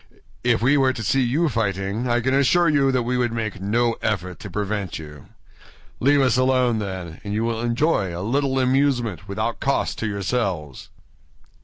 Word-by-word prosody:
"If 120 -2 +2
we 140 +4 +4
were 130 -1 +3
to 110 - -6
see 135 +6 +2
you 140 +8 +1
fighting, 105 - -1
I 120 0 +1
can 130 +3 0
assure 140 +6 +4
you 140 -3 +3
that 130 -2 +1
we 125 +1 -1
would 120 -2 +1
make 110 -4 -4
no 115 +4 +1
effort 90 -4 -2
to 105 - -8
prevent 100 -1 -3
you. 75 -2 -11 0.7
Leave 140 +2 +4
us 125 -3 +3
alone, 130 -3 +2
then, 95 -5 -6
and 105 0 -4
you 110 - 0
will 115 -1 -1
enjoy 120 - +1
a 85 +2 -5
little 135 +3 0
amusement 125 - +1
without 110 +4 -3
cost 140 0 -1
to 115 - -1
yourselves." 100 - -3
115 Hz, 180 wpm, -22 LUFS, 100-130 Hz, 0.7 s, we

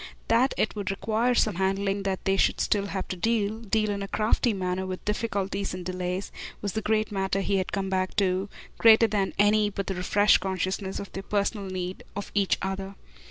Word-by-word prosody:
That 240 +4 +3
it 215 - 0
would 205 -2 -3
require 220 +5 +1
some 215 -6 +2
handling, 195 +1 0
that 195 -1 -3
they 195 - +3
should - - +2
still 200 -1 +1
have 190 -1 -4
to - - -2
deal, 215 +2 0
deal 215 -1 0
in 200 -1 -3
a 195 - -3
crafty 220 +4 +1
manner, 185 -2 -2
with 185 0 -6
difficulties 200 -3 -2
and 180 -1 -7
delays, 185 +1 -3 0.3
was 200 -2 -3
the 220 - -1
great 215 0 0
matter 195 -1 0
he 195 +1 +1
had 185 - -2
come 195 -1 -1
back 185 0 0
to, 190 -1 +1 0.3
greater 225 0 +7
than 200 -3 0
any 210 +1 +4
but 195 -1 -4
the 195 - -2
refreshed 200 +3 +4
consciousness 190 +1 -2
of 200 - -7
their 195 - -5
personal 200 0 -1
need 185 0 -4
of 205 - -5
each 200 -2 +2
other. 195 0 -4
195 Hz, 205 wpm, -27 LUFS, 190-210 Hz, 0.3 s, greater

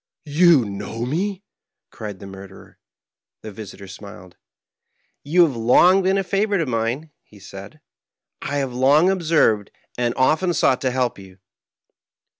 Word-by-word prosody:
" - - -50 0.2
You 165 -9 +6
know 105 +3 -5
me? 190 +8 -3 0.2
" - - -65
cried 105 -3 -8
the 100 - -11
murderer. 95 0 -13 0.6
The 110 - -7
visitor 100 -1 -10
smiled. 95 -2 -12 0.5
" - - -49
You 180 0 +7
have 145 -6 -3
long 175 +12 +4
been 190 +1 +1
a 195 - 0
favorite 200 +1 0
of 160 - -2
mine," 120 +6 -2
he - - -20
said; - - -12 0.3
" - - -62
and - - -5
I - - -2
have 135 -3 -2
long 145 +8 +4
observed 155 - +1 0.3
and 120 -1 0
often 160 +7 +2
sought 130 -3 +2
to 130 - 0
help 125 -3 -2
you." 95 -1 -14
130 Hz, 165 wpm, -21 LUFS, 110-170 Hz, 0.6 s, You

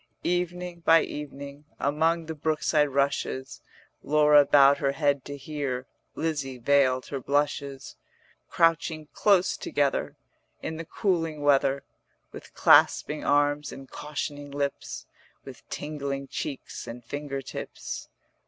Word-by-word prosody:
Evening 180 0 -2
by 165 0 +5
evening 140 0 -8
Among 160 +4 +1
the 160 - -5
brookside 155 -1 +1
rushes, 135 -1 -1 0.4
Laura 150 0 +5
bowed 140 0 +6
her 140 -1 +1
head 140 -2 +1
to 145 0 -6
hear, 135 -3 -4 0.3
Lizzie 140 -5 -2
veiled 130 0 +3
her 140 - -3
blushes: 140 0 -2 0.5
Crouching 165 -2 +1
close 195 -3 +3
together 140 -2 -1 0.4
In 160 - -5
the 165 - -6
cooling 165 -5 -1
weather, 140 -1 +3 0.5
With - - -12
clasping 150 0 +4
arms 145 0 +2
and 135 0 -10
cautioning 145 -1 -5
lips, 140 0 -4 0.4
With - - -12
tingling 140 -2 -4
cheeks 135 - -5
and 120 0 -8
finger 140 +1 -5
tips. - - -7
145 Hz, 115 wpm, -27 LUFS, 140-155 Hz, 0.5 s, bowed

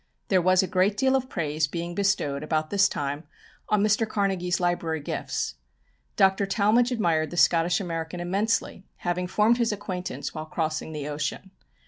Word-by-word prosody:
There 185 -2 +4
was 185 +1 +4
a - - -2
great 195 +3 +1
deal 265 +3 +3
of 260 -1 -1
praise 155 -2 -1
being 170 +3 -4
bestowed 180 -8 0
about 155 0 -1
this 200 -1 +4
time 145 +2 -3 0.4
on 210 -1 +3
Mr. 215 +1 +2
Carnegie's 190 -4 0
library 175 -2 0
gifts. 105 - -3 0.6
Dr. 195 +1 +3
Talmage 225 +5 +3
admired 165 -9 +1
the 175 - -7
Scottish 170 0 +4
American 165 -2 -4
immensely, 195 +3 -1 0.2
having 180 +1 -1
formed 215 +6 +3
his 235 -2 +2
acquaintance 190 -3 -5
while 155 0 -6
crossing 160 0 -2
the 150 -2 -5
ocean. 150 +5 -4
180 Hz, 160 wpm, -26 LUFS, 160-200 Hz, 0.6 s, There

